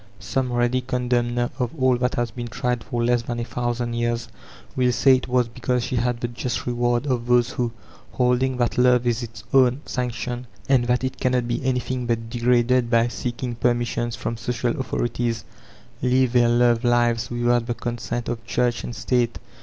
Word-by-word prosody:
Some 125 Hz, +7 st, -2 dB
ready 120 Hz, +1 st, +1 dB
condemner 120 Hz, -1 st, 0 dB
of 125 Hz, -2 st, 0 dB
all 130 Hz, -1 st, +4 dB
that 125 Hz, +1 st, 0 dB
has 120 Hz, -1 st, -1 dB
been 120 Hz, +2 st, -6 dB
tried 120 Hz, +2 st, -2 dB
for 120 Hz, -3 st, -2 dB
less 120 Hz, 0 st, +2 dB
than 120 Hz, 0 st, -4 dB
a -, -, -1 dB
thousand 120 Hz, -1 st, -2 dB
years, 120 Hz, 0 st, -1 dB, 0.5 s
will 125 Hz, -1 st, +3 dB
say 130 Hz, +2 st, +5 dB
it 130 Hz, -, -6 dB
was 125 Hz, -1 st, +2 dB
because 125 Hz, +1 st, -1 dB
she 125 Hz, 0 st, -2 dB
had 120 Hz, 0 st, 0 dB
the 120 Hz, -, 0 dB
just 120 Hz, +1 st, -4 dB
reward 120 Hz, +1 st, 0 dB
of 125 Hz, -4 st, -1 dB
those 125 Hz, 0 st, +3 dB
who, 120 Hz, -2 st, -1 dB, 0.4 s
holding 125 Hz, +1 st, +1 dB
that 120 Hz, 0 st, 0 dB
love 125 Hz, -1 st, +4 dB
is 120 Hz, 0 st, +1 dB
its 115 Hz, -3 st, -8 dB
own 130 Hz, 0 st, +4 dB
sanction 120 Hz, 0 st, -3 dB, 0.2 s
and 130 Hz, -3 st, +3 dB
that 125 Hz, +1 st, +1 dB
it 130 Hz, -, -3 dB
cannot 125 Hz, -2 st, +1 dB
be 120 Hz, +1 st, -2 dB
anything 125 Hz, -1 st, -1 dB
but 115 Hz, -1 st, -2 dB
degraded 120 Hz, 0 st, +2 dB
by 115 Hz, 0 st, +3 dB
seeking 120 Hz, +1 st, -4 dB
peffnissions 120 Hz, 0 st, 0 dB
from 115 Hz, -, -4 dB
social 120 Hz, +1 st, -1 dB
authorities, 120 Hz, -3 st, -2 dB, 0.6 s
live 125 Hz, 0 st, +2 dB
their 120 Hz, -1 st, +4 dB
love 120 Hz, 0 st, +3 dB
lives 120 Hz, -2 st, +2 dB
without 120 Hz, 0 st, +1 dB
the 120 Hz, -, -1 dB
consent 120 Hz, 0 st, -4 dB
of 115 Hz, -1 st, -3 dB
Church 120 Hz, +1 st, 0 dB
and 120 Hz, -, -5 dB
State. 120 Hz, -2 st, 0 dB
120 Hz, 185 wpm, -23 LUFS, 120-125 Hz, 0.6 s, say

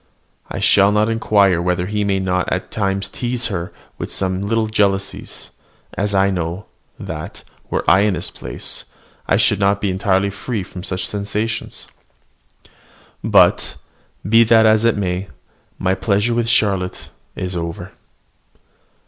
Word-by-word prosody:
I -, -, -5 dB
shall 100 Hz, 0 st, +5 dB
not 105 Hz, +1 st, +2 dB
inquire 100 Hz, -5 st, +3 dB
whether 90 Hz, 0 st, 0 dB
he 105 Hz, +2 st, -1 dB
may 100 Hz, -1 st, +1 dB
not 90 Hz, -1 st, -1 dB
at -, -, -2 dB
times 100 Hz, -2 st, -1 dB
tease 120 Hz, +3 st, -2 dB
her 85 Hz, -1 st, -4 dB, 0.3 s
with -, -, -5 dB
some 95 Hz, +1 st, -1 dB
little 115 Hz, +1 st, +1 dB
jealousies; 100 Hz, -3 st, -1 dB, 0.4 s
as 100 Hz, 0 st, -1 dB
I 95 Hz, 0 st, +3 dB
know, 90 Hz, +2 st, -3 dB, 0.3 s
that, -, -, -7 dB, 0.3 s
were -, -, -1 dB
I 95 Hz, -, +6 dB
in 100 Hz, -1 st, +2 dB
his -, -, -4 dB
place, -, -, -6 dB, 0.4 s
I -, -, +4 dB
should -, -, +3 dB
not 100 Hz, 0 st, +2 dB
be 100 Hz, -2 st, -1 dB
entirely 95 Hz, +1 st, +1 dB
free 100 Hz, +1 st, -4 dB
from 90 Hz, 0 st, -9 dB
such 95 Hz, -1 st, -3 dB
sensations. 105 Hz, +2 st, -3 dB, 1.4 s
But, -, -, +4 dB, 0.5 s
be 115 Hz, +2 st, +6 dB
that 115 Hz, 0 st, +5 dB
as 110 Hz, +1 st, +4 dB
it 115 Hz, -2 st, +3 dB
may, 95 Hz, -1 st, -2 dB, 0.5 s
my 95 Hz, -, +1 dB
pleasure 100 Hz, +4 st, +1 dB
with 115 Hz, -1 st, 0 dB
Charlotte 100 Hz, -6 st, +1 dB, 0.3 s
is 90 Hz, 0 st, -4 dB
over. 85 Hz, -1 st, -5 dB
100 Hz, 145 wpm, -19 LUFS, 95-105 Hz, 1.4 s, I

